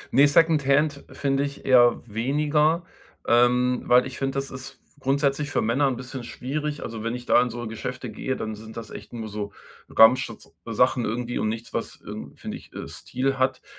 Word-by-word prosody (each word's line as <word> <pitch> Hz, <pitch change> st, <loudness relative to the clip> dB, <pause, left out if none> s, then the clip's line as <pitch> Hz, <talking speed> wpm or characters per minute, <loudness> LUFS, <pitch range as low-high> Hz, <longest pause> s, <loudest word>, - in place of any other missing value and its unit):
Ne, 140 Hz, +2 st, +7 dB
Secondhand 150 Hz, -2 st, +3 dB
find 135 Hz, -1 st, 0 dB
ich 140 Hz, 0 st, -3 dB
eher 120 Hz, -2 st, +6 dB
weniger, 150 Hz, -, +1 dB, 0.4 s
ähm, 125 Hz, +1 st, +4 dB
weil 125 Hz, +1 st, +6 dB
ich 130 Hz, -, -7 dB
finde, 135 Hz, 0 st, -1 dB
das 135 Hz, 0 st, -3 dB
ist 130 Hz, 0 st, -9 dB, 0.2 s
grundsätzlich 140 Hz, +2 st, +1 dB
für -, -, 0 dB
Männer 130 Hz, +5 st, +2 dB
'n 130 Hz, -, 0 dB
bisschen 125 Hz, 0 st, -7 dB
schwierig. 145 Hz, +5 st, -4 dB
Also, 110 Hz, -1 st, -6 dB
wenn 115 Hz, +1 st, -2 dB
ich 125 Hz, 0 st, -8 dB
da -, -, +5 dB
in 125 Hz, -, 0 dB
so 120 Hz, +1 st, -6 dB
Geschäfte 125 Hz, +3 st, -5 dB
gehe, 130 Hz, -, -3 dB
dann 110 Hz, 0 st, -4 dB
sind 110 Hz, +1 st, -10 dB
das 115 Hz, -3 st, -7 dB
echt -, -, -10 dB
nur 115 Hz, -2 st, -5 dB
so 105 Hz, -1 st, -5 dB, 0.4 s
Ramschs 115 Hz, 0 st, +4 dB
sachen 125 Hz, +2 st, +2 dB
irgendwie 120 Hz, +2 st, -2 dB
und 110 Hz, -, 0 dB
nichts, 115 Hz, +1 st, -5 dB
was, -, -, -4 dB
irgend -, -, -9 dB
finde -, -, -5 dB
ich, -, -, -17 dB
äh, -, -, -6 dB
Stil 135 Hz, +1 st, -2 dB
hat. 130 Hz, 0 st, +1 dB
130 Hz, 190 wpm, -25 LUFS, 120-140 Hz, 0.4 s, Ne